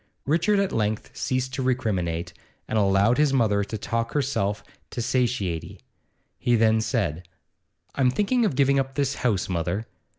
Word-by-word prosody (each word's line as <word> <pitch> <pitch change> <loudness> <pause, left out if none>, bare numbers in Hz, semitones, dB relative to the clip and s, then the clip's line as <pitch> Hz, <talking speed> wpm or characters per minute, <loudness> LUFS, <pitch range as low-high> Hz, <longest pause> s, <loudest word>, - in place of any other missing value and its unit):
Richard 170 +8 +2
at 200 -1 +1
length 110 -1 -2
ceased 130 0 -2
to 130 - -2
recriminate, 90 -10 -1 0.3
and 110 - 0
allowed 100 +5 +3
his 150 -2 +3
mother 105 -6 +2
to 105 +2 -5
talk 115 +2 -2
herself 115 -8 -1 0.3
to - - -6
satiety. 115 -9 -1 0.6
He 120 - +2
then 110 0 +3
said: 85 -5 -2 0.7
'I'm 130 -2 +3
thinking 210 - +1
of 205 - +1
giving 140 0 +3
up 135 0 -3
this 140 -1 +1
house, 105 -7 +1
mother. 90 +4 -2
115 Hz, 155 wpm, -25 LUFS, 100-135 Hz, 0.7 s, allowed